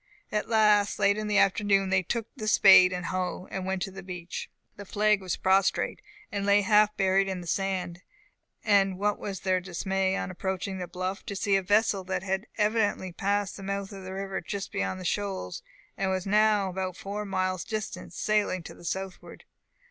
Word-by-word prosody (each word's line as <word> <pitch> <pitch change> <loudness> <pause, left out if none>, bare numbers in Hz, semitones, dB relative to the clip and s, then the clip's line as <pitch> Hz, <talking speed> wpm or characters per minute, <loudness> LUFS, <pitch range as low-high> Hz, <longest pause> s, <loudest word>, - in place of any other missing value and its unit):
At 210 +1 -1
last, 210 -2 +4
late 200 0 +3
in 215 0 -3
the 210 -1 +1
afternoon, 195 -1 +3
they 190 0 +4
took 225 +5 -2
the 215 - -5
spade 190 -3 +7
and 180 0 -4
hoe, 185 0 -3
and 190 -1 -4
went 190 -1 -1
to 195 - -5
the 195 +1 -9
beach. 180 -2 -7 0.3
The 200 - -8
flag 210 +1 +2
was 185 -1 -2
prostrate, 190 - +2 0.3
and 200 -1 -2
lay 200 +1 +4
half 210 +1 +4
buried 195 0 +3
in 190 -1 -3
the - - -9
sand; 185 -1 -2 0.6
and 195 -3 +3
what 205 +1 0
was 195 -2 -5
their 185 -1 +1
dismay, 190 +2 -1
on - - -3
approaching 190 +1 -3
the 180 - -4
bluff, 185 +2 -4
to 200 - -4
see 200 0 +1
a 195 - +3
vessel 205 0 +2
that 190 -1 -2
had 190 +3 -2
evidently 210 -3 +1
passed 200 +3 -1
the - - -9
mouth 200 +1 -4
of 195 -1 -9
the 185 0 -7
river 195 0 -4
just 200 -1 -5
beyond 185 -1 -2
the 185 - -8
shoals, 195 - -2 0.3
and 195 -1 -1
was 185 -1 -1
now 210 0 +3
about 185 -1 -4
four 205 +2 -5
miles 185 -2 -1
distant, 215 -6 -5
sailing 205 -2 0
to - - -9
the - - -16
southward. 190 +2 -6
195 Hz, 195 wpm, -28 LUFS, 185-205 Hz, 0.6 s, spade